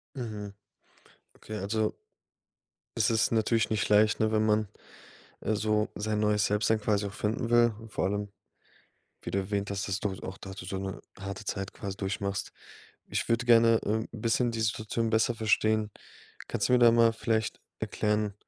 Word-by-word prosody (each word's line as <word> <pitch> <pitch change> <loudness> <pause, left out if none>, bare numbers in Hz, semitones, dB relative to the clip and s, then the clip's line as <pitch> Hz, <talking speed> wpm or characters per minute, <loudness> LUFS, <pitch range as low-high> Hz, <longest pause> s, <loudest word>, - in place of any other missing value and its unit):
Mhm, 105 -5 -5 0.8
okay, 110 - -9
also 110 +2 0 1.0
es - - +3
ist 110 +1 +2
natürlich 115 0 +2
nicht 105 -1 0
leicht, 105 +1 +4
ne? 110 0 +2
Wenn 110 0 +2
man, 105 -1 +2 0.7
äh, 110 0 0
so 105 0 +1
sein 105 0 -1
neues 105 -1 +2
Selbst-Sein 110 +1 +1
quasi 105 -1 +1
auch 100 - -6
finden 115 +3 -2
will, 120 -2 +5
vor 105 - -2
allem, 100 +1 -2 0.9
wie - - -6
du 100 - +1
erwähnt 100 +1 -2
hast, 100 0 -3
dass 95 +1 -1
du 105 - -1
halt 95 - -9
auch 95 +1 -6
da 95 - -9
du 95 - -8
so 95 +1 -4
'ne 95 0 -5 0.2
harte 100 +1 -6
Zeit 95 -1 -4
quasi 100 -2 -6
durchmachst. 100 0 -3 0.5
Ich - - -2
würde 120 +1 +1
gerne, 115 -1 +6
ähm, 110 +1 0
'n 115 - -8
bisschen 115 +2 +2
die 115 -1 -4
Situation 110 +1 -1
besser 110 +2 +2
verstehen. 110 -1 +1 0.6
Kannst - - 0
du 125 - +4
mir - - +5
da 120 -1 +8
mal 115 -1 +5
vielleicht 110 -1 -1 0.2
erklären, 105 -1 -1
110 Hz, 180 wpm, -29 LUFS, 100-110 Hz, 1.0 s, da